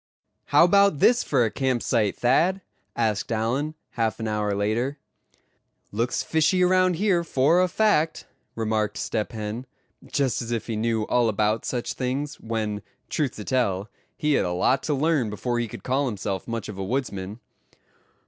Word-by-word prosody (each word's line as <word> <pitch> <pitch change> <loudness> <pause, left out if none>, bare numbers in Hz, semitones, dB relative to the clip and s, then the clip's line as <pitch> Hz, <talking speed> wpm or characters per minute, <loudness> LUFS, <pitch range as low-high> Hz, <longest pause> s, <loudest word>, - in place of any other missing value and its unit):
"How - - +5
about 200 -1 +5
this 240 - +4
for 130 -5 +2
a 110 - -1
camp 130 -3 0
site, 110 -5 +1
Thad?" 170 +10 +2 0.3
asked 110 -3 0
Allan, 125 +8 -1 0.2
half 115 -1 -1
an 110 - -3
hour 105 -1 -1
later. 115 +8 -1 0.9
"Looks 115 +4 -1
fishy 165 +3 +2
around 185 0 +3
here, 180 -1 +2
for 160 +3 +3
a 185 - +3
fact," 180 -5 +1 0.3
remarked 110 -2 -1
Step 110 - -2
Hen, 110 +3 -5 0.4
just 135 -5 0
as 115 - -6
if 115 -2 -2
he 115 - -3
knew 110 0 0
all 120 +1 +2
about 105 +1 0
such 120 -2 -2
things; 135 +3 -3
when, 110 -2 -3 0.3
truth 145 -5 -1
to 105 - -7
tell, 105 -5 0 0.3
he 150 -2 +1
had - - +3
a 90 - -1
lot 125 +9 +2
to 150 - -1
learn 145 -5 +1
before 120 +3 -2
he 120 - -1
could - - -10
call 135 +2 +1
himself 100 -4 -3
much 115 -2 -4
of 100 -2 -7
a - - -2
woodsman. 100 -3 -3
120 Hz, 170 wpm, -25 LUFS, 110-145 Hz, 0.9 s, How